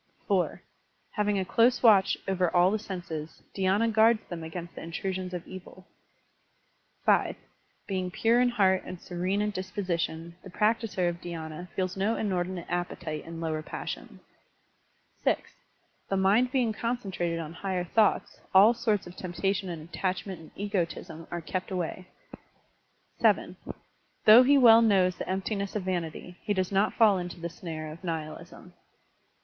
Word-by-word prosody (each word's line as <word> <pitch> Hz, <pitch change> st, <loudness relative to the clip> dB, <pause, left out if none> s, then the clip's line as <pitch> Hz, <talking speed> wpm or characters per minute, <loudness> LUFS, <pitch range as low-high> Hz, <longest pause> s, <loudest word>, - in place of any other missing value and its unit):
(4) -, -, 0 dB, 0.5 s
Having 210 Hz, -1 st, 0 dB
a 190 Hz, -, 0 dB
close 240 Hz, +6 st, +3 dB
watch 205 Hz, -5 st, +6 dB
over 185 Hz, -2 st, +1 dB
all 180 Hz, +2 st, +5 dB
the 215 Hz, -, 0 dB
senses, 170 Hz, -6 st, -7 dB
dhydna 200 Hz, +4 st, +2 dB
guards 220 Hz, +1 st, +4 dB
them 170 Hz, -2 st, -5 dB
against 170 Hz, +1 st, -7 dB
the -, -, -9 dB
intrusion 185 Hz, +2 st, -4 dB
of 175 Hz, -, -6 dB
evils. 185 Hz, 0 st, -11 dB, 1.2 s
(5) -, -, +3 dB, 0.5 s
Being 185 Hz, -2 st, -2 dB
p\u*e 230 Hz, +6 st, +3 dB
in 250 Hz, -, +4 dB
heart 190 Hz, -5 st, +3 dB
and 180 Hz, -, -8 dB
serene 185 Hz, +4 st, -1 dB
in 210 Hz, -, -1 dB
disposition, 180 Hz, -4 st, -3 dB
the 190 Hz, -, -10 dB
practiser 210 Hz, -2 st, +1 dB
of 170 Hz, 0 st, -3 dB
dhydna 165 Hz, 0 st, -7 dB
feels 185 Hz, -1 st, -1 dB
no 200 Hz, +4 st, +1 dB
inordinate 185 Hz, -3 st, -2 dB
appetite 175 Hz, -3 st, -3 dB
in 165 Hz, 0 st, -7 dB
lower 160 Hz, -1 st, -2 dB
passions. -, -, -7 dB, 1.0 s
(6) -, -, +3 dB, 0.7 s
The 195 Hz, -, +1 dB
mind 210 Hz, +7 st, +3 dB
being 250 Hz, -5 st, +1 dB
concentrated 195 Hz, -8 st, -2 dB
on 165 Hz, -1 st, -5 dB
higher 185 Hz, 0 st, -2 dB
thoughts, 210 Hz, +4 st, +1 dB, 0.2 s
all 205 Hz, +5 st, +8 dB
sorts 215 Hz, -4 st, 0 dB
of 175 Hz, -, -11 dB
temptation 190 Hz, +1 st, -2 dB
and 160 Hz, -2 st, -6 dB
attachment 185 Hz, 0 st, -3 dB
and 160 Hz, -, -13 dB
egotism 170 Hz, -5 st, -3 dB
are 175 Hz, -, -4 dB
kept 185 Hz, +3 st, -4 dB
away. 185 Hz, 0 st, -4 dB, 1.1 s
(7) -, -, +2 dB, 0.7 s
Though 220 Hz, +3 st, +10 dB
he 280 Hz, +3 st, +5 dB
well 230 Hz, -3 st, +8 dB
knows 190 Hz, -5 st, +3 dB
the -, -, -5 dB
emptiness 195 Hz, +1 st, -2 dB
of 210 Hz, -, -1 dB
vanity, 180 Hz, -1 st, -4 dB
he 205 Hz, -2 st, -1 dB
does 185 Hz, 0 st, -1 dB
not 200 Hz, +2 st, +2 dB
fall 210 Hz, -5 st, +5 dB
into 175 Hz, -1 st, -6 dB
the 170 Hz, 0 st, -4 dB
snare 160 Hz, -2 st, -6 dB
of 165 Hz, +4 st, -12 dB
nihilism. 160 Hz, -3 st, -6 dB
185 Hz, 150 wpm, -28 LUFS, 175-205 Hz, 1.2 s, Though